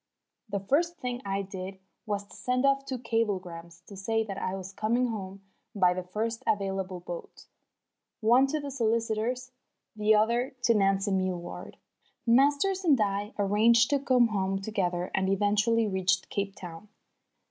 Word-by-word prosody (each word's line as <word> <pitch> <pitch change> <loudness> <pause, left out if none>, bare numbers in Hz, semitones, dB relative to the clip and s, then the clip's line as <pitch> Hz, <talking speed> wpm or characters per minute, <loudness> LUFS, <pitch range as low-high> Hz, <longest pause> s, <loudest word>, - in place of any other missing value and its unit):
The 200 0 -1
first 335 - +1
thing 245 0 -4
I 195 0 -1
did 190 0 -7 0.3
was 205 -1 -2
to - - -15
send 250 +1 0
off 275 0 +3
two 265 -2 -3
cablegrams 185 -8 -3
to 200 - -11
say 225 +4 0
that 200 -3 -6
I 185 - -2
was 190 0 -7
coming 235 +5 +1
home 195 -3 -6 0.3
by 180 -3 +4
the 185 - -3
first 220 +5 -3
available 195 -2 -1
boat, 175 0 -8 0.7
one 240 +4 +5
to 305 +3 -1
the 285 -1 -5
solicitors, 230 +1 -1 0.4
the 215 0 +4
other 235 +5 +1
to 230 - +5
Nancy 195 -1 +2
Milward. 185 -2 -3 0.5
Masters 285 +10 +3
and 295 -8 +4
I 205 0 -1
arranged 225 +5 +4
to 285 - +3
come 250 -3 +3
home 195 -2 -1
together 185 -3 -2
and 190 0 +1
eventually 210 +3 +2
reached 190 -1 0
Cape 200 0 -2
Town. 175 +2 -9
210 Hz, 155 wpm, -28 LUFS, 195-240 Hz, 0.7 s, one